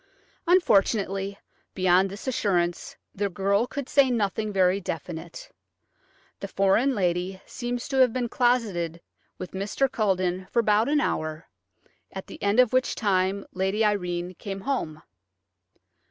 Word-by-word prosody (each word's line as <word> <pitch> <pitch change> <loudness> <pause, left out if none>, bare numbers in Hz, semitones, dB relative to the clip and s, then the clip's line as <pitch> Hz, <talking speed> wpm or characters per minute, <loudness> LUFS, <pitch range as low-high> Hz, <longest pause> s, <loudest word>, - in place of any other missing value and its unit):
Unfortunately, 200 - +2 0.4
beyond 185 +1 +3
this 200 +6 -9
assurance 180 -8 -1 0.2
the 200 +1 -1
girl 200 +4 +1
could 280 -1 -5
say 280 -2 +4
nothing 215 -2 -1
very 190 -1 +3
definite. 165 0 -7 0.9
The 200 - -5
foreign 195 +8 +2
lady 180 0 -1
seems 245 0 -4
to 270 - -1
have 255 -2 +5
been 245 0 -2
closeted 220 -10 0 0.4
with 185 - -7
Mr. 200 +8 0
Culledon 185 -5 -1
for 235 - +2
about 215 +3 +2
an 295 0 +3
hour, 155 - -2 0.7
at 190 - -7
the - - -12
end 205 +4 +2
of 250 -1 +5
which 255 0 +1
time 195 -2 0
Lady 190 +4 0
Irene 180 -3 -1
came 195 +1 -7
home. 160 - -3
195 Hz, 135 wpm, -26 LUFS, 185-235 Hz, 0.9 s, have